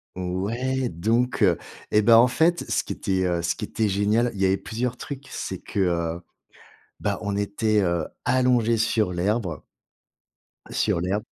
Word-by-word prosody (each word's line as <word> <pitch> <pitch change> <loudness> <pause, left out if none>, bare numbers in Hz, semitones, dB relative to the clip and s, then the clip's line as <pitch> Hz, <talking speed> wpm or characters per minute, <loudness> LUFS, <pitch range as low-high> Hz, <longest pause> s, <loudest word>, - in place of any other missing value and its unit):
Ouais, 115 +9 -2
donc 115 +9 0
heu, 90 -6 +4 0.3
et 105 - +5
ben 115 +1 +7
en 120 - +7
fait 165 +7 +1
ce - - +1
qui - - -7
était 95 -1 -1
heu, 85 -1 0
ce 85 0 -1
qui - - -7
était 110 +1 -1
génial, 105 +5 +2
il 100 - -6
y 95 - +4
avait 95 +1 +3
plusieurs 120 +5 -3
trucs, 140 +1 -7
c'est - - -4
que - - -5
heu, 85 -2 0 0.8
bah - - -1
on 100 -1 -2
était 105 +1 0
heu, 85 -3 0 0.2
allongés 125 -3 +3
sur 110 -3 +1
l'herbe 90 -2 -1 1.1
sur 85 - 0
l'herbe 100 +4 -1
105 Hz, 170 wpm, -24 LUFS, 90-120 Hz, 1.1 s, ben